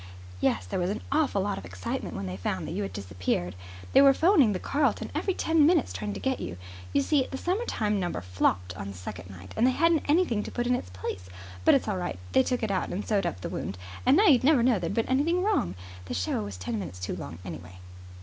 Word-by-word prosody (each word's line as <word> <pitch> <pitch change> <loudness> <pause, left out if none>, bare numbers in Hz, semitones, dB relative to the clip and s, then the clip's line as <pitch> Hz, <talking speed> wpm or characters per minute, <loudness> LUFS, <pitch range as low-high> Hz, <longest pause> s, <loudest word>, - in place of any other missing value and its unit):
"Yes, 90 0 +1
there 90 - -3
was 180 0 0
an 205 - -3
awful 280 -10 +2
lot 205 - -2
of - - -11
excitement 90 0 -5
when 95 - -4
they 90 0 -4
found 95 -1 -3
that - - -5
you - - -2
had 95 -2 -3
disappeared. 90 -2 -2 0.4
They 270 - +8
were 275 -1 +7
phoning 320 - +5
the 190 - -1
Carlton 285 0 0
every 385 - -1
ten 325 -1 +3
minutes 320 -2 +3
trying 205 -1 -4
to - - -5
get 265 -1 -1
you. 85 - -5 0.3
You 140 - +2
see, 280 -4 +2
the 265 - -4
summertime 270 - 0
number 175 -2 -2
flopped 90 +1 0
on 100 - -6
the 100 -2 -7
second 90 -1 -8
night, 95 0 -11
and 230 +3 +4
they - - +4
hadn't 330 +3 +2
anything 295 - +3
to - - -6
put 240 - -2
in 250 - +2
its 245 - -2
place. 90 0 -6 0.3
But - - +6
it's 270 - 0
all 205 -3 -1
right. 175 - -3
They 130 - +5
took 245 - -1
it 215 - 0
out 185 - -1
and 200 +4 -4
sewed 200 -4 +1
up 90 - -5
the - - -4
wound, 95 - -4 0.3
and 260 +4 +5
now 415 - +5
you'd 265 - +6
never 275 -3 +5
know 240 -5 +3
there 170 - -2
had - - -3
been 230 - +1
anything 325 +8 +2
wrong. 385 - +1 0.3
The - - -4
show 90 +4 -1
was 100 -2 -7
ten 105 +4 -3
minutes 90 -2 -6
too 90 - -3
long, 75 +4 -7
anyway." 90 +1 -8
195 Hz, 255 wpm, -28 LUFS, -, 0.4 s, They